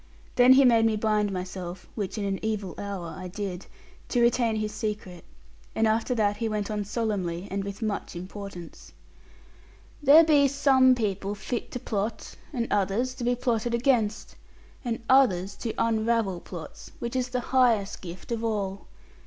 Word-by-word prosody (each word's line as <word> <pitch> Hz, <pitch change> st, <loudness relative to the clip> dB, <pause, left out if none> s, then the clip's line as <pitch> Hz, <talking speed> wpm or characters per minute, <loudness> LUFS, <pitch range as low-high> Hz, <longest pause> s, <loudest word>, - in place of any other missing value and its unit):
Then 250 Hz, +1 st, +7 dB
he 270 Hz, +1 st, +6 dB
made 230 Hz, -2 st, +5 dB
me 220 Hz, -, +1 dB
bind 210 Hz, -1 st, +1 dB
myself, 185 Hz, -1 st, -6 dB
which 205 Hz, -1 st, -4 dB
in 205 Hz, -, -2 dB
an 195 Hz, -1 st, -1 dB
evil 210 Hz, -5 st, -2 dB
hour 195 Hz, -5 st, -5 dB
I 185 Hz, 0 st, -7 dB
did, 190 Hz, -1 st, -5 dB, 0.4 s
to 245 Hz, -, +1 dB
retain 235 Hz, -1 st, +3 dB
his 215 Hz, -1 st, -2 dB
secret; 205 Hz, -6 st, -5 dB, 0.5 s
and 225 Hz, -, +2 dB
after 225 Hz, +3 st, +1 dB
that 205 Hz, -2 st, +1 dB
he 225 Hz, +1 st, -1 dB
went 210 Hz, 0 st, -2 dB
on 210 Hz, -1 st, -1 dB
solemnly, 200 Hz, -5 st, -2 dB
and 195 Hz, 0 st, -2 dB
with 200 Hz, +3 st, -6 dB
much 210 Hz, -4 st, -3 dB
importance, 185 Hz, -1 st, -9 dB, 1.1 s
'There 295 Hz, +3 st, +8 dB
be 295 Hz, -3 st, +5 dB
some 260 Hz, -2 st, +4 dB
people 200 Hz, -3 st, -2 dB
fit 235 Hz, +3 st, -4 dB
to 250 Hz, -, -3 dB
plot, 215 Hz, 0 st, -3 dB, 0.2 s
and 240 Hz, -5 st, -1 dB
others 205 Hz, +6 st, +1 dB
to 255 Hz, -, -7 dB
be 245 Hz, +1 st, +2 dB
plotted 235 Hz, -1 st, 0 dB
against, 235 Hz, -4 st, 0 dB, 0.5 s
and 230 Hz, -2 st, -3 dB
others 200 Hz, -8 st, +4 dB
to 230 Hz, -, -3 dB
unravel 225 Hz, -4 st, +1 dB
plots, 170 Hz, -2 st, -10 dB
which 235 Hz, +1 st, -5 dB
is 255 Hz, -1 st, 0 dB
the 250 Hz, 0 st, -1 dB
highest 235 Hz, -6 st, +3 dB
gift 180 Hz, +4 st, -9 dB
of 230 Hz, -1 st, -2 dB
all. 200 Hz, -3 st, -2 dB
215 Hz, 165 wpm, -27 LUFS, 195-240 Hz, 1.1 s, There